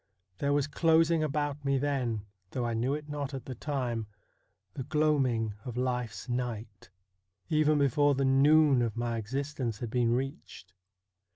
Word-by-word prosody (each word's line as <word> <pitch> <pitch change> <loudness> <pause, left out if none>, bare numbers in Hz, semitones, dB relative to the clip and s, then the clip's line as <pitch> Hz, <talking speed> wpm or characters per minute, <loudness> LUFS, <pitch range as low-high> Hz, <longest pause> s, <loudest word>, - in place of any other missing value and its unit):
There 140 - +1
was 145 -1 +2
closing 165 +1 +3
about 145 -1 -1
me 140 -1 +2
then, 130 -6 -1 0.2
though 125 +3 -2
I 120 - -1
knew 125 +5 0
it 150 0 -7
not 145 -2 -4
at 135 - -7
the 130 - -5
time, 120 -4 -3 0.7
the - - -5
gloaming 130 -6 +1
of 125 -2 -6
life's 125 -4 -2
night, 120 -4 -4 0.6
even 155 0 +3
before 145 +1 +3
the 135 0 +1
noon 140 0 +5
of 115 -2 -1
my 120 -1 -1
existence 125 0 -3
had 115 0 -5
been 120 -1 +2
reached. 130 - -6
135 Hz, 155 wpm, -30 LUFS, 120-145 Hz, 0.7 s, noon